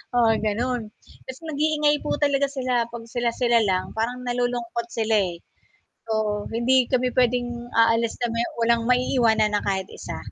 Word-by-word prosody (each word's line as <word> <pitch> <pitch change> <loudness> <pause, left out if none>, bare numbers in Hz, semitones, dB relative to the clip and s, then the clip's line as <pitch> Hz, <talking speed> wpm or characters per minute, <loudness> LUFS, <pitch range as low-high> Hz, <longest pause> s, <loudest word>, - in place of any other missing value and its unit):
Oo, 235 -2 +4
gano'n. 235 +3 -1 0.4
Kasi 260 0 -8
nag-iingay 300 0 +2
po - - 0
talaga 280 -1 +3
sila, 255 -3 0
'pag 230 -1 -8
sila-sila 240 0 +1
lang, 185 -1 0
parang 245 +3 -2
nalulungkot 245 -1 -2
sila, 220 -1 +1 0.2
eh. 170 - -13 0.7
So, 210 -1 -1
hindi 245 +2 +2
kami 250 -1 +1
pwedeng 245 -1 0
aalis 230 0 +3
na 240 - +1
may 230 - 0 0.2
walang 235 0 +2
maiiwanan 230 -4 +2
na 205 - +1
kahit 190 -1 -1
isa. - - -7
240 Hz, 150 wpm, -24 LUFS, 225-250 Hz, 0.7 s, Oo